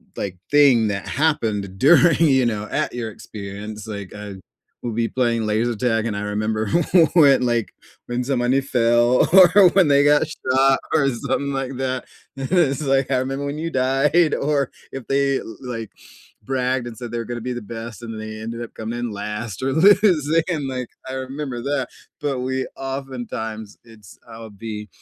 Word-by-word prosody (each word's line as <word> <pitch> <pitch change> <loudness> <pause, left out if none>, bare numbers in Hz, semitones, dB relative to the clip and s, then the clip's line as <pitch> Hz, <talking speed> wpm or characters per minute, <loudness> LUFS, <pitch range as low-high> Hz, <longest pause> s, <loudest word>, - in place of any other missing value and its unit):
like, 95 -2 -4
thing 135 -7 +5
that 100 -1 -3
happened 110 -10 -1
during, 165 - +5
you 135 -5 +4
know, 105 -3 -1
at - - -1
your 120 -2 -4
experience, 105 +1 -8
like, 100 -3 -7
I'd 105 -2 -8 0.4
we'll 120 - -4
be 115 +1 0
playing 115 -3 0
laser 115 +3 0
tag, 115 -1 0
and 110 - -2
I 100 - -3
remember 105 +1 -2 0.4
when, 140 -6 +6
like, 120 -2 -1 0.3
when 120 +1 -2
somebody 130 0 +1
fell, 120 -1 +3
or 190 +1 +8
when 185 -5 +4
they 140 0 +4
got 145 +1 +5
shot 135 -2 +2
or 140 -4 +3
something 140 +3 -2
like 135 0 -3
that, 130 -1 -2 0.3
and 135 -1 -4
it's 155 -5 +2
like, 135 -1 +1
"I 130 - +3
remember 135 +2 -2
when 140 +1 -4
you 165 +2 -3
died." 135 +5 +2
Or 140 -2 0 0.2
if 135 -3 -7
they, 140 0 +1 0.2
like, 115 -4 -6 0.5
bragged 125 0 -1
and 115 - -8
said 120 -2 -7
they 120 - -3
were 115 - -3
gonna 120 0 -5
be 125 +1 -4
the 120 - -5
best, 115 +1 -8
and 115 -1 -6
then 110 - -7
they 110 0 -7
ended 115 +1 -6
up 120 - -8
coming 110 +2 -5
in 120 -1 -3
last 105 +2 -5
or 135 0 0
losing, 165 -4 +4
and, 150 -6 -2
like, 125 -2 -4 0.2
I - - -5
remember 130 -1 -5
that. 140 -2 -1 0.3
But 140 -3 -1
we, 130 +1 -2
oftentimes 125 -5 -6
it's 110 -4 -16
I'll 115 -1 -10
be 105 0 -7
125 Hz, 180 wpm, -21 LUFS, 110-140 Hz, 0.5 s, or